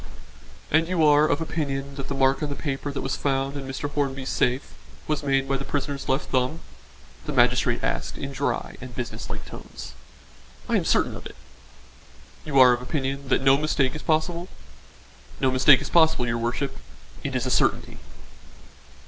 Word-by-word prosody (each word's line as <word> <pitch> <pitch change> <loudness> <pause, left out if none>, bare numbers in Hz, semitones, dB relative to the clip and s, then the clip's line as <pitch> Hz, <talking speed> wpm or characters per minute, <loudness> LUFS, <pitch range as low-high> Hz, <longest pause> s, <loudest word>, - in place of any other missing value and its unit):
"And 160 +2 +3
you 175 -3 +2
are 150 0 +6
of 145 +2 0
opinion 140 -4 -3
that 135 -1 -6
the 140 - -3
mark 135 0 +2
on 150 - -1
the 140 - -3
paper 140 -1 -3
that 140 - -4
was 135 - -1
found 135 0 -1
in 135 -2 -5
Mr. 135 +2 -3
Hornby's 135 -2 -2
safe, 125 +2 0 0.3
was 155 -1 0
made 135 -1 +1
by 135 0 0
the 135 - -5
prisoner's 140 0 -3
left 135 +3 0
thumb?" 130 +5 0 0.7
the - - -1
magistrate - - +2
asked - - -2
in 140 - -5
dry 140 +1 -2
and 125 -2 -9
business 120 -2 -5
like - - -5
tones. 65 - -10 0.7
"I - - +1
am - - +1
certain - - +2
of - - -8
it." - - -14 1.1
"You 140 -3 +2
are 125 -1 +8
of 120 - -2
opinion 135 +1 -3
that 135 - +1
no 135 0 +6
mistake 140 -3 +1
is 155 - -6
possible?" 170 +3 0 0.9
"No 130 - +2
mistake 130 +2 +6
is - - -6
possible, 160 -7 +4
your 115 -1 -1
worship. 120 +4 -2 0.5
It - - -3
is - - 0
a - - -1
certainty." - - +1
140 Hz, 180 wpm, -25 LUFS, 135-150 Hz, 1.1 s, are